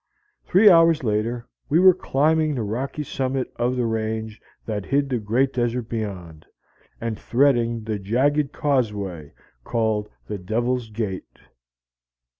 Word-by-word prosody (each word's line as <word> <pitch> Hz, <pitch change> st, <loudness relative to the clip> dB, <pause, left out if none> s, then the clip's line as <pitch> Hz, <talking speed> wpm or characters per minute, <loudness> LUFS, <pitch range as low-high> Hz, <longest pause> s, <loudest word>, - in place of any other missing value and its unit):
Three 200 Hz, +4 st, +5 dB
hours 165 Hz, -5 st, +6 dB
later, 115 Hz, +2 st, -1 dB, 0.2 s
we 150 Hz, -, +3 dB
were 185 Hz, 0 st, +8 dB
climbing 155 Hz, -2 st, +1 dB
the 120 Hz, -, -2 dB
rocky 130 Hz, +8 st, -3 dB
summit 130 Hz, -1 st, -3 dB
of 120 Hz, +2 st, 0 dB
the 125 Hz, -1 st, 0 dB
range 110 Hz, -1 st, -3 dB, 0.2 s
that 105 Hz, -3 st, -4 dB
hid 140 Hz, 0 st, +1 dB
the 125 Hz, -3 st, 0 dB
great 120 Hz, +6 st, +1 dB
desert 120 Hz, -1 st, -1 dB
beyond, 90 Hz, -8 st, -5 dB, 0.6 s
and 115 Hz, -2 st, -4 dB
threading 120 Hz, -3 st, +2 dB
the 110 Hz, -1 st, -3 dB
jagged 135 Hz, +8 st, +1 dB
causeway 105 Hz, -, -1 dB, 0.3 s
called 110 Hz, -, -1 dB, 0.2 s
the 105 Hz, -2 st, -5 dB
Devil's 120 Hz, +5 st, -1 dB
Gate. 105 Hz, -4 st, -5 dB
120 Hz, 130 wpm, -23 LUFS, 110-135 Hz, 0.6 s, were